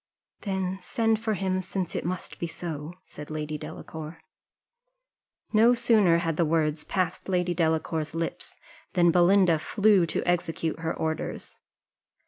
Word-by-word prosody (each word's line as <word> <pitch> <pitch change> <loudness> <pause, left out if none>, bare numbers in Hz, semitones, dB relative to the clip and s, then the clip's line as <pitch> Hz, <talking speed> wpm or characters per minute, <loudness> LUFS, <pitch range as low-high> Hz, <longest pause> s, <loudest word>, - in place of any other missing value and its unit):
"Then 190 -2 -2
send 225 -1 +1
for 220 -1 -1
him, 185 -1 -1
since 185 -1 -4
it - - -2
must 180 +1 -5
be 170 - -2
so," 165 -1 -6
said 150 0 -10
Lady 155 0 -4
Delacour. 160 +2 -8 1.4
No 230 +3 +6
sooner 220 -8 +4
had 165 -2 -1
the 170 - +3
words 155 -1 +1
passed 185 -1 -2
Lady 180 -1 +1
Delacour's 160 -2 -1
lips 165 0 -4 0.4
than 175 -2 +4
Belinda 175 -1 +4
flew 200 0 +3
to - - -2
execute 165 -2 -1
her 160 0 -2
orders. 160 0 -4
175 Hz, 135 wpm, -27 LUFS, 160-190 Hz, 1.4 s, No